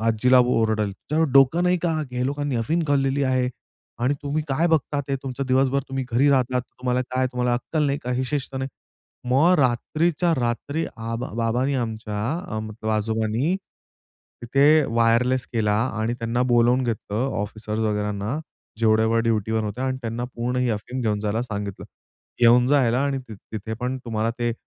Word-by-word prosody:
आजीला 125 +3 +4
ओरडेल. 110 -4 +1
तुझ्याकडे 155 +9 -1
डोकं 135 +6 +5
नाही 180 0 +3
का? 170 - +1 0.2
ह्या 125 0 -2
लोकांनी 145 -1 -1
अफीम 155 +10 0
खाललेली 140 0 +2
आहे 130 -1 +1 0.6
आणि 135 +3 +2
तुम्ही 145 +2 -1
काय 150 +5 +2
बघता. 150 -2 +1
ते 135 - 0
तुमचं 135 0 -4
दिवसभर 135 +1 +2
तुम्ही 135 0 -3
घरी 135 +5 +4
राहतात. 130 -2 +2 0.2
तुम्हाला 125 0 0
काय 130 0 +1
तुम्हाला 125 0 0
अक्कल 150 +5 -1
नाही 140 0 0
का 125 - -4
हे 130 +1 0
शिस्त 140 -2 -2
नाही. 130 +1 -2 0.6
मग 155 +8 +5
रात्रीच्या 155 +7 +1
रात्री 130 +6 -1
आबा 115 +2 -4
बाबांनी 125 +5 +1
आमच्या 110 -4 -3 0.4
अम 110 - -3
मतलब 110 0 -5
आजोबांनी, 110 - 0 0.9
तिथे 135 +4 +3 0.3
वायरलेस 120 +2 +3
केला 105 -3 +1 0.3
आणि 115 +2 0
त्यांना 115 +1 0
बोलावून 120 +2 +4
घेतलं 115 +1 -2
ऑफिसर्स 105 +1 -4
वगैरांना 105 +3 -1 0.4
जेवढे 110 -1 +4
वेळ 115 +1 +2
ड्युटीवर 110 -1 0
होत्या 110 +5 -3
आणि 130 0 -1
त्यांना 115 +1 -3
पूर्ण 120 +2 -2
ही 125 -1 +1
अफीम 115 +4 -4
घेऊन 105 -3 0
जायला 105 +2 -1
सांगितलं. 100 -5 -5 0.6
घेऊन 120 +1 +6
जा 145 -2 +5
याला 120 +2 +1
आणि 140 -1 0
तिथे 110 +1 -7
पण 125 +1 -1
तुम्हाला 115 -1 -1
ते 120 -1 0
125 Hz, 165 wpm, -23 LUFS, 110-135 Hz, 0.9 s, घेऊन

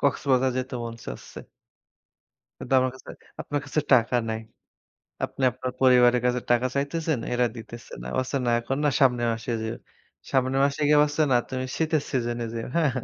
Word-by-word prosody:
কক্সবাজার 135 -2 +2
যেতে 130 0 -4
মন 115 - -5
চাচ্ছে। - - -8 1.2
কিন্তু 135 - 0
আমার 130 0 +1
কাছে, 130 - -11 0.3
আপনার 145 0 -2
কাছে 145 +3 -1
টাকা 120 0 +4
নাই। 110 - -2 0.9
আপনি 135 - -6
আপনার 130 +1 -4
পরিবারের 125 -1 +5
কাছে 125 0 +1
টাকা 120 +1 +3
চাইতেছেন, 155 +1 -1
এরা 120 0 +2
দিতেছে 115 +1 -10
না। 60 - -8
বলছে 130 +2 -1
না 120 - +1
এখন 135 +3 -3
না - - +4
সামনের 125 -3 +3
মাসে 115 +2 -4
যেও। 110 +1 -3 0.5
সামনের 130 +1 +1
মাসে 140 +1 -1
গিয়ে 150 0 +6
বলছে 150 +1 0
না 125 - +6
তুমি 130 0 -3
শীতের 160 -2 +1
সিজনে 120 -2 -1
যেও, 115 - -4
হ্যাঁ। 160 -5 +3
130 Hz, 170 wpm, -25 LUFS, 120-140 Hz, 1.2 s, গিয়ে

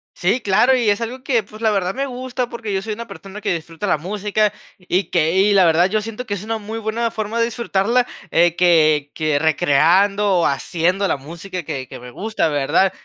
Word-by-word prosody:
Sí, 195 +8 0
claro, 215 +6 +3
y 235 -4 +1
es 205 - +2
algo 250 +3 -5
que, 240 -6 +1
pues, 215 +2 -14
la 220 -1 +3
verdad 190 -2 -1
me 275 +1 -1
gusta, 250 -1 -4
porque 225 -3 -5
yo 190 - 0
soy 220 - -5
una 235 +2 -7
persona 195 +2 -10
que 190 - -1
disfruta 165 +4 -5
la - - +2
música, 205 +5 -1 0.3
y 180 0 -1
que, 165 -2 +2
y 200 +1 +4
la 195 - +5
verdad, 170 +3 +4
yo 215 +1 0
siento 225 +3 -6
que 205 - -3
es 200 0 -5
una 225 +1 -2
muy 220 +1 -6
buena 225 +1 -1
forma 220 +2 -3
de 230 - +3
disfrutarla. 235 +1 0 0.3
Eh, 170 0 +3
que 155 -5 +3
que 155 -2 0
recreando, 175 +5 +3
haciendo 175 +7 0
la - - +1
música 170 +6 -7
que 135 -5 -5
que - - -10
me 125 0 -11
gusta, 215 - -1
¿verdad? 150 +6 +2
195 Hz, 215 wpm, -20 LUFS, 170-220 Hz, 0.3 s, la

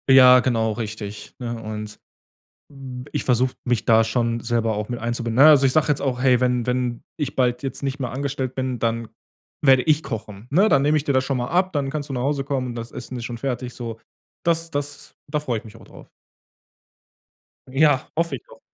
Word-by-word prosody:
Ja, 130 -1 +9
genau, 115 -3 +1
richtig, 105 -2 -6
ne? 120 -2 -4
Und, 105 -1 -6 0.7
hm, 130 -3 -8
b - - -16
ich - - -2
versuche 125 +1 +2
mich 120 -3 0
da 115 -1 +5
schon 115 +1 0
selber 115 -2 0
auch 105 0 -3
mit 120 - -3
einzubinden. 120 0 -3
Na 135 - +6
ja, - - +10
also 140 -2 +6
ich 130 - +2
sage 155 +2 +2
jetzt 150 -1 +1
auch: 130 -3 -1
„Hey, 125 -2 +4
wenn 125 -2 +1
wenn 125 -1 -1 0.2
ich 140 -2 -3
bald 125 -1 +1
jetzt 135 0 -5
nicht 135 0 -2
mehr 125 -3 -2
angestellt 135 -1 -3
bin, 130 -2 -2
dann 115 0 -1 0.5
werde 135 -3 +5
ich 155 +1 +2
kochen“, 105 -3 -7
ne? 190 +9 +4
„Dann 140 -7 +4
nehme 150 +2 +3
ich 150 - 0
dir 145 - +1
das 130 -1 +2
schon 135 0 -1
mal 120 0 -2
ab, 185 +4 +1
dann 140 -3 -1
kannst 145 0 -4
du - - -5
nach 125 - -2
Hause 140 0 0
kommen, 130 -3 -2
das 115 0 -7
Essen 125 +1 -7
ist 120 - -6
schon 120 -1 -5
fertig“, 125 -1 -3
so. 115 -2 -6 0.4
Das 165 0 0
das 145 -1 -5
da 150 +1 0
freu 130 -6 -2
ich 110 - -12
mich 110 0 -12
auch 115 - -15
drauf. - - -15 1.6
Ja, 135 0 +3
hoffe 165 -3 0
ich - - -19
doch, - - -16
125 Hz, 225 wpm, -23 LUFS, 115-140 Hz, 1.6 s, ja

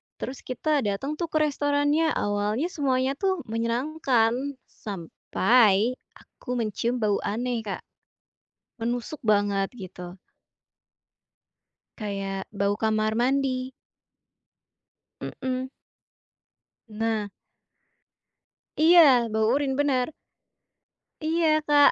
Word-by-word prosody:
Terus 260 - -6
kita 295 +4 0
dateng 270 +10 -2
tuh 345 - 0
ke 315 - -1
restorannya, 290 +2 +1
awalnya 205 +8 0
semuanya 265 -3 +1
tuh 380 -3 0
menyenangkan 235 +1 +1 0.4
sampai 205 +3 +2 0.2
aku - - -17
mencium 230 +1 -1
bau 205 -1 +2
aneh, 240 +3 -1
Kak, 195 - -4 1.0
menusuk 240 +5 -2
banget, 205 -2 +2
gitu. 180 -5 -9 1.8
Kayak 195 -3 -4
bau 200 0 +1
kamar 215 0 +1
mandi. 255 +1 0 1.5
Mhm. 260 0 -4 1.2
Nah. 220 -1 -2 1.5
Iya, 335 +3 +7 0.3
bau 220 0 +2
urine, 275 -1 0
bener. 270 -3 +2 1.1
Iya, 320 +1 +1 0.2
Kak, 290 -1 +6
245 Hz, 85 wpm, -26 LUFS, 210-285 Hz, 1.8 s, Iya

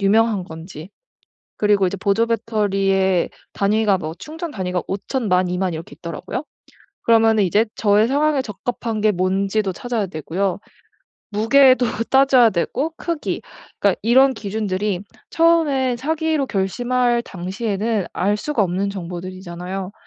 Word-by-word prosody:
유명한 210 0 +3
건지 160 +1 -10 0.7
그리고 205 -2 +3
이제 200 - -3
보조 200 +4 +2
배터리의 195 -5 +1 0.2
단위가 205 0 +2
뭐 155 -1 -5
충전 325 +2 -7
단위가 180 -4 -2
5,000, 215 +3 -3
10,000, 180 0 +3
20,000 180 -1 -1
이렇게 160 +1 -8
있더라고요. 180 - -5 0.6
그러면은 225 -2 +4
이제 210 +5 +3
저의 210 +1 +3
상황에 285 +1 +2
적합한 225 -1 -4
게 215 0 +4
뭔지도 195 +2 0
찾아야 240 -4 -2
되고요, 180 +4 -2 0.7
무게도 255 +4 +5 0.2
따져야 265 -3 +5
되고, 255 - -1
크기 335 -3 -3 0.4
그러니까 200 -2 +2
이런 260 +4 +5
기준들이 205 -2 -2 0.3
처음에 305 -7 +2
사기로 315 +2 -1
결심할 240 +4 0
당시에는 200 +2 -2
알 205 +2 +1
수가 245 -1 -1
없는 190 +2 -1
정보들이잖아요. 185 +1 -6
210 Hz, 305 characters per minute, -20 LUFS, 190-245 Hz, 0.7 s, 무게도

